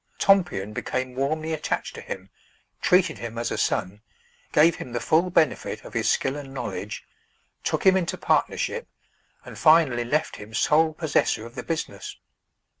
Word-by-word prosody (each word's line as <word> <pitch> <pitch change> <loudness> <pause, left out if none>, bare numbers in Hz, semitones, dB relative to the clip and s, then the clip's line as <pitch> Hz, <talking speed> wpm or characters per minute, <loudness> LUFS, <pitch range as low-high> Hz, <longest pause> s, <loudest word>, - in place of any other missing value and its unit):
Tompion 175 - +2
became 130 +3 -3
warmly 155 +5 -1
attached 155 - -2
to - - -8
him, 95 0 -7 0.5
treated 180 0 +3
him 115 -1 -6
as 120 0 -2
a - - -2
son, 100 +3 -1 0.5
gave 160 +2 +5
him 125 - -8
the 120 - -1
full 170 +7 +2
benefit 160 -5 0
of - - -10
his - - +1
skill 135 +1 +1
and 140 -2 -8
knowledge, 100 -4 -5 0.6
took - - -1
him 190 0 +7
into 180 -3 -1
partnership, 475 0 0 0.6
and - - -10
finally 155 -7 +5
left 145 +6 -1
him 110 +2 -10
sole 155 +6 +3
possessor 155 -8 0
of 115 - -11
the - - -5
business. 165 -2 -5
145 Hz, 160 wpm, -25 LUFS, 115-165 Hz, 0.6 s, him